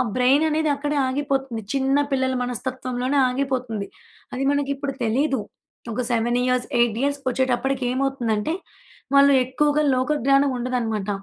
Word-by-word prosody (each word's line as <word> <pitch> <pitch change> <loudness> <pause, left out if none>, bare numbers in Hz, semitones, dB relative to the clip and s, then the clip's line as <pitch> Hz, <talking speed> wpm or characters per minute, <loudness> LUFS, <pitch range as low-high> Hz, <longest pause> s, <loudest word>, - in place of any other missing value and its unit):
Brain 260 +4 +4
అనేది 310 0 +1
అక్కడే 290 +1 -2
ఆగిపోతుంది 270 -3 -2
చిన్న 270 0 +2
పిల్లల 260 -1 +1
మనస్తత్వం‌లోనే 255 +2 -3
ఆగిపోతుంది. 250 -5 -2 0.5
అది 260 +2 -2
మనకి 285 -1 0
ఇప్పుడు 275 0 -4
తెలియదు. 265 +3 +1 0.5
ఒక 250 - -1
7 240 +1 +1
ఇయర్స్, 250 -1 0
8 235 -2 +2
ఇయర్స్‌కొచ్చేటప్పటికి 265 -1 0
ఏమవుతుందంటే 255 -1 -1 0.6
వాళ్ళు 280 0 +7
ఎక్కువగా 295 +3 +1
లోక 255 +4 0
జ్ఞానం 275 +1 +4
ఉండదన్నమాట. 230 -5 -2
260 Hz, 125 wpm, -23 LUFS, 245-275 Hz, 0.6 s, వాళ్ళు